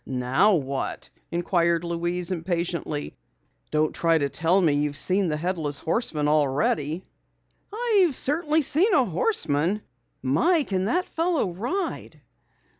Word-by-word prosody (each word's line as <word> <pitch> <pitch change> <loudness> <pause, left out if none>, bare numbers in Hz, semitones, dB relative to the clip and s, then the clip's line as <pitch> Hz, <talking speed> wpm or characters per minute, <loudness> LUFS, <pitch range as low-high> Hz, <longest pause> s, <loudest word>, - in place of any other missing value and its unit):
"Now 130 +11 +2
what?" 135 -3 -4 0.2
inquired 170 -1 +1
Louise 175 +1 -2
impatiently. 170 -3 -3 0.5
"Don't 155 0 0
try 165 -1 +2
to 140 -2 -1
tell 165 +6 +2
me 165 -6 +3
you've 145 0 -1
seen 185 +4 +2
the 150 -2 -1
Headless 160 -4 -2
Horseman 160 - -1
already?" 150 +2 0 0.7
"I've 415 - +2
certainly 305 +3 +1
seen 345 - +3
a 265 - +4
horseman! 180 - 0 0.4
My, 300 - +3
can 190 -6 -2
that 360 - 0
fellow 325 - -1
ride!" 335 - -4
175 Hz, 120 wpm, -25 LUFS, 150-245 Hz, 0.7 s, a